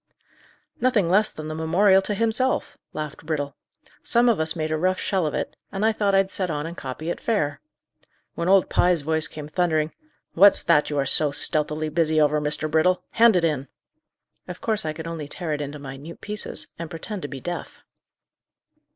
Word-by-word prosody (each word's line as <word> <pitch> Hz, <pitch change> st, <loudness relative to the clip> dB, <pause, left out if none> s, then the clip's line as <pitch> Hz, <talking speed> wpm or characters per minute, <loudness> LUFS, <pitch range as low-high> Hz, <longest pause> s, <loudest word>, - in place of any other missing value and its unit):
"Nothing 230 Hz, -9 st, +2 dB
less 210 Hz, +3 st, +3 dB
than 155 Hz, 0 st, -8 dB
the 155 Hz, -, -4 dB
memorial 190 Hz, +5 st, +3 dB
to 205 Hz, +2 st, -3 dB
himself," 230 Hz, +5 st, 0 dB, 0.2 s
laughed 150 Hz, 0 st, -6 dB
Brittle. 145 Hz, -3 st, -3 dB, 0.5 s
"Some 240 Hz, +1 st, +3 dB
of 225 Hz, -, +2 dB
us 160 Hz, +2 st, +2 dB
made 155 Hz, -1 st, -2 dB
a -, -, +1 dB
rough 185 Hz, +4 st, 0 dB
shell 190 Hz, -5 st, 0 dB
of 150 Hz, -, -3 dB
it, -, -, -3 dB, 0.2 s
and 200 Hz, +2 st, -1 dB
I 225 Hz, -, +4 dB
thought 205 Hz, -2 st, +1 dB
I'd 195 Hz, 0 st, +2 dB
set 185 Hz, -2 st, -1 dB
on 150 Hz, -1 st, -2 dB
and 170 Hz, +1 st, -6 dB
copy 155 Hz, +3 st, -5 dB
it -, -, -5 dB
fair. 150 Hz, -11 st, -1 dB, 0.7 s
When 170 Hz, +2 st, -2 dB
old 195 Hz, -1 st, +5 dB
Pye's 175 Hz, -4 st, +2 dB
voice 160 Hz, +1 st, 0 dB
came 150 Hz, -1 st, -8 dB
thundering, 155 Hz, -2 st, 0 dB, 0.4 s
'What's 200 Hz, +3 st, +6 dB
that 155 Hz, -3 st, +3 dB
you 145 Hz, -, -3 dB
are 140 Hz, -, +1 dB
so 150 Hz, +3 st, +2 dB
stealthily 150 Hz, +2 st, +1 dB
busy 155 Hz, 0 st, +1 dB
over, 150 Hz, 0 st, +3 dB
Mr. 150 Hz, +1 st, 0 dB
Brittle? 160 Hz, +4 st, +2 dB
hand 230 Hz, -2 st, +5 dB
it 175 Hz, -, +2 dB
in,' 150 Hz, -4 st, 0 dB, 0.8 s
of 180 Hz, -, -7 dB
course 220 Hz, -6 st, 0 dB
I 155 Hz, -, -2 dB
could 160 Hz, +1 st, -8 dB
only 165 Hz, -3 st, -5 dB
tear 160 Hz, +1 st, -4 dB
it 150 Hz, -, -3 dB
into 145 Hz, +1 st, -5 dB
minute 140 Hz, +3 st, -9 dB
pieces, 210 Hz, -7 st, -2 dB
and 165 Hz, -1 st, -5 dB
pretend 180 Hz, +4 st, -6 dB
to 145 Hz, -, -4 dB
be 135 Hz, -2 st, -7 dB
deaf." 175 Hz, +4 st, -6 dB
160 Hz, 195 wpm, -24 LUFS, 150-190 Hz, 0.8 s, What's